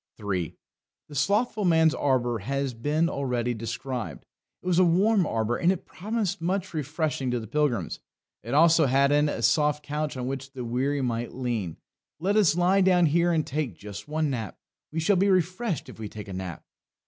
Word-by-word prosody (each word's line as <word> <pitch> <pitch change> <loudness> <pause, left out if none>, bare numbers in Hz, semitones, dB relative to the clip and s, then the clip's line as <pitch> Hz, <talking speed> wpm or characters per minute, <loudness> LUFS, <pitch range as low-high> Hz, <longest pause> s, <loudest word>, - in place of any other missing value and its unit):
3. 95 -6 -3 0.5
The - - -11
Slothful 205 - +1
Man's 160 -3 +4
Arbour 120 -4 +1
has 135 +5 -2
been 150 +8 0
already 125 -5 -1
described. 115 +2 -5 0.4
It - - -19
was 180 -1 +2
a - - +7
warm 190 +2 +3
arbour, 115 +1 0
and 175 - +3
it 190 - -4
promised 210 -3 -3
much 185 +2 -1
refreshing 150 -3 -2
to 125 0 0
the 110 - -7
pilgrims. 120 - -1 0.4
It 120 +5 -3
also 160 -1 +6
had 140 +2 +3
in 145 +1 +3
it - - -2
a - - -5
soft 150 -1 +2
couch 150 -1 -3
on 125 - -3
which 135 +1 -5
the 125 -3 -5
weary 135 +4 0
might 120 -1 -2
lean. 115 -10 -3 0.4
"Let 195 +5 +1
us 200 -7 +4
lie 185 +3 +4
down 180 -2 +5
here 170 +3 +3
and 160 -2 +1
take 135 - -3
just 100 - -9
one 155 -1 0
nap; 115 -4 -4 0.3
we 160 - -2
shall 185 +5 +3
be 195 +3 +3
refreshed 185 +1 0
if - - -12
we 110 -2 -5
take 105 -1 -9
a - - -6
nap!" 90 -3 -6
145 Hz, 195 wpm, -26 LUFS, 120-170 Hz, 0.5 s, a